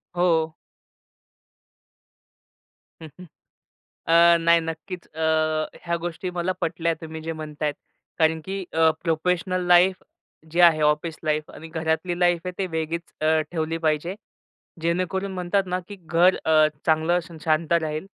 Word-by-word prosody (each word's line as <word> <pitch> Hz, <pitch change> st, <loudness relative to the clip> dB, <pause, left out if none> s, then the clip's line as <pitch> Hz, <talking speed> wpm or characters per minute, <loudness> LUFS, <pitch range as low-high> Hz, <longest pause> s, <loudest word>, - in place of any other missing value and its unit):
हो. 165 Hz, -3 st, +2 dB, 2.5 s
हं, 160 Hz, -, -8 dB
हं. 180 Hz, -, -10 dB, 0.8 s
अ, 170 Hz, +1 st, +6 dB
नाही 170 Hz, 0 st, +4 dB
नक्कीच 165 Hz, +3 st, -7 dB
अ, 160 Hz, -, -7 dB, 0.6 s
ह्या 170 Hz, 0 st, 0 dB
गोष्टी 175 Hz, +1 st, -4 dB
मला 175 Hz, +2 st, 0 dB
पटल्या 165 Hz, 0 st, 0 dB
तुम्ही 160 Hz, 0 st, -7 dB
जे 165 Hz, +1 st, -3 dB
म्हणतायत 150 Hz, -1 st, -4 dB, 0.4 s
कारण 160 Hz, -1 st, +2 dB
की 195 Hz, 0 st, -4 dB
अ, 160 Hz, 0 st, +4 dB
प्रोफेशनल 180 Hz, +2 st, 0 dB
लाईफ 180 Hz, +1 st, +4 dB, 0.5 s
जे 170 Hz, +3 st, 0 dB
आहे, 165 Hz, -3 st, +6 dB
ऑफिस 150 Hz, +2 st, +1 dB
लाईफ 155 Hz, 0 st, -1 dB
आणि 160 Hz, -, -11 dB
घरातली 160 Hz, +2 st, -2 dB
लाईफ 175 Hz, -1 st, +3 dB
आहे 180 Hz, -, -3 dB
ते 195 Hz, -, 0 dB
अ, -, -, -4 dB
वेगळीच 160 Hz, +1 st, -2 dB, 0.5 s
ठेवली 165 Hz, -1 st, -2 dB
पाहिजे. 160 Hz, +2 st, 0 dB, 0.7 s
जेणेकरून 185 Hz, +3 st, -1 dB
म्हणतात 185 Hz, +2 st, 0 dB
ना 180 Hz, 0 st, -1 dB
की 205 Hz, -, -8 dB
घर 175 Hz, +1 st, +3 dB
अ, 155 Hz, -1 st, +5 dB, 0.2 s
चांगलं 160 Hz, +2 st, +3 dB, 0.3 s
शांत 155 Hz, +1 st, +1 dB
राहील 155 Hz, 0 st, 0 dB
165 Hz, 135 wpm, -24 LUFS, 160-180 Hz, 2.5 s, अ